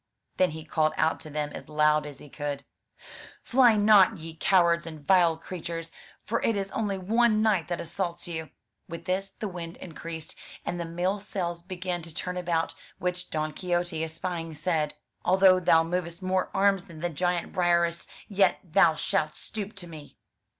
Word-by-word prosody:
Then 185 - +4
he 155 0 -8
called 155 0 +1
out 160 - +2
to 155 - -10
them 150 0 -2
as - - -9
loud 150 0 +3
as 145 - -9
he - - -13
could: 145 -1 -5 0.8
"Fly 245 -3 +5
not, 205 -2 +6
ye 160 0 -8
cowards 170 -1 +3
and 155 -3 -9
vile 175 -3 +5
creatures! 165 -1 -6 0.3
for 230 +2 -1
it 225 - +2
is 195 -1 -3
only 205 -3 -1
one 215 +3 +3
knight 195 -8 +2
that 175 - -2
assaults 175 0 -4
you." 160 -3 -5 0.4
With 170 +1 -7
this 190 +2 -1
the 215 - -6
wind 175 -2 -7
increased, 165 -2 -7 0.3
and 175 - -3
the 170 - -2
mill 180 +4 -1
sails 175 -4 -3
began 180 -1 -3
to 165 -1 -10
turn 180 0 -3
about; 170 -2 0 0.2
which 180 0 -3
Don 155 -1 -2
Quixote 175 -2 -1
espying, 165 0 -4
said: 155 -1 -1 0.3
"Although 185 0 +6
thou 165 -2 +5
movest 170 +1 -3
more 185 0 +1
arms 195 -1 +2
than 160 -4 -11
the 175 - 0
giant 175 +2 -1
Briareus, 170 -1 +2 0.2
yet 195 -2 +3
thou 170 -2 +4
shalt 155 0 0
stoop 210 -1 -6
to 195 -3 -7
me." 155 -3 -11
175 Hz, 175 wpm, -28 LUFS, 160-185 Hz, 0.8 s, not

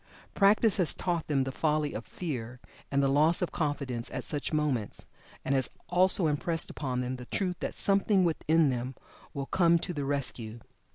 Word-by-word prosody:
Practice 210 +1 +4
has 180 -5 +2
taught 170 -3 -2
them 140 -3 +1
the 135 - -3
folly 150 +1 0
of 115 - -6
fear 125 -8 -5 0.3
and 140 0 +1
loss 155 +6 +3
of 175 - -2
confidence 140 -6 -2
at - - -5
such 145 -2 -3
moments, 145 -9 -1 0.4
and 135 - +1
has 130 -2 0 0.2
also 180 0 +4
impressed 160 +2 0
upon 130 -4 -3
them 125 +1 -3
the 125 - -9
truth 180 +5 -2
that - - -4
something 195 -1 +3
within 160 -2 +2
them 125 +1 -3 0.4
will 140 -1 -3
come 170 +2 +3
to 175 +2 -4
the 145 -3 -3
rescue. 120 -5 -2
150 Hz, 175 wpm, -29 LUFS, 130-170 Hz, 0.4 s, Practice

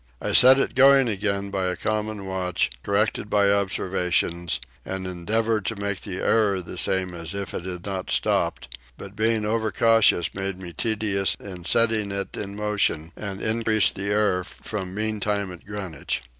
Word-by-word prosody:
I - - -2
set 130 +2 +8
it 135 - 0
going 135 -1 +6
again 100 -2 -2
by 95 -1 -1
a 90 - -1
common 105 0 -3
watch, 95 -6 -1
corrected 105 +1 0
by 100 -1 +3
observations, 90 -3 0 0.2
and 95 0 -5
endeavoured 110 +5 -1
to 115 - -2
make 100 -2 -3
the 95 -3 -5
error 105 -4 +2
the 90 0 -6
same 95 -1 +1
as 85 +2 -4
if 100 -1 -4
it 85 - -5
had 90 -1 -6
not 95 -2 -4
stopped; 65 -1 +1 0.2
but 100 +1 -10
being 110 0 +1
over 110 0 0
cautious 115 -7 +3
made 95 -1 -3
me 90 -2 -8
tedious 105 -3 0
in 90 -4 -9
setting 110 +1 +2
it 100 0 -2
in 100 -1 -6
motion, 105 -6 0
and 100 -2 -6
increased 110 -1 +2
the 100 +1 -4
error 100 -3 +1
from 95 0 -7
mean 110 0 -1
time 100 -1 -1
at 90 +2 -12
Greenwich. 95 - -4
100 Hz, 170 wpm, -24 LUFS, 95-110 Hz, 0.2 s, set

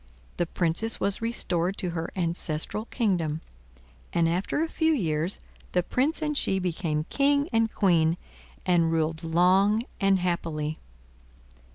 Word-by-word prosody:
The 175 - 0
Princess 175 +7 0
was 200 +1 0
restored 190 -5 -1
to 180 -4 -1
her 165 0 -3
ancestral 170 +3 -2
kingdom, 175 -11 -1 0.7
and 170 -1 +2
after 185 - 0
a - - -1
few 320 0 +1
years 165 - -1 0.3
the 180 - +2
Prince 290 - 0
and 300 -1 -1
she 190 -8 +5
became 165 -4 -1
King 285 +1 +2
and 225 -1 +2
Queen, 170 -4 +3 0.5
and 170 -3 +3
ruled 160 0 0
long 185 +6 +3 0.2
and 195 -1 +4
happily. 165 -4 -2
180 Hz, 135 wpm, -27 LUFS, 165-215 Hz, 0.7 s, she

